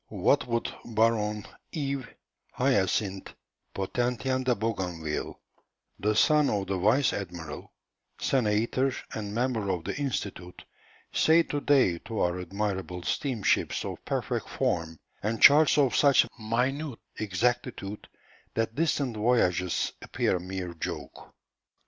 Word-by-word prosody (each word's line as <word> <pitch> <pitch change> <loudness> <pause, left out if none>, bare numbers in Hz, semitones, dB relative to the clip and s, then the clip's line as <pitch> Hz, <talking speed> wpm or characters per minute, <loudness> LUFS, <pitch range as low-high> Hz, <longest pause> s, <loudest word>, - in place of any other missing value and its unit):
What - - +2
would 115 -1 -1
Baron 110 -2 +1 0.3
Yves 140 -5 -3 0.5
Hyacinth 100 -6 0 0.4
Potentien 125 +6 -1
de 125 -1 +2
Bougainville, 90 -8 -3 0.6
the 105 +1 +1
son 150 +5 +4
of 100 -2 0
the 95 0 -2
vice 115 +9 +3
admiral, 85 -6 -6 0.5
senator, 120 +2 +1 0.2
and 105 -1 -4
member 115 -4 0
of 90 -3 -1
the 100 +3 -3
Institut, 100 -10 -4 0.5
say 165 +1 +5
to 145 -2 -3
day 130 -14 +3
to 115 +3 -5
our 90 +1 0
admirable 95 -1 -3
steamships 125 -4 0
of - - -6
perfect - - -2
form, 80 -1 -1 0.2
and 110 +2 -1
charts 150 +1 +7
of 135 -5 +3
such 140 -3 +5
minute 125 +5 -1 0.2
exactitude 110 0 -2 0.5
that 115 0 0
distant 140 -4 0
voyages 100 -6 +1
appear - - 0
a - - -6
mere 90 -1 -5
joke. 80 - -7
110 Hz, 120 wpm, -28 LUFS, 95-130 Hz, 0.6 s, charts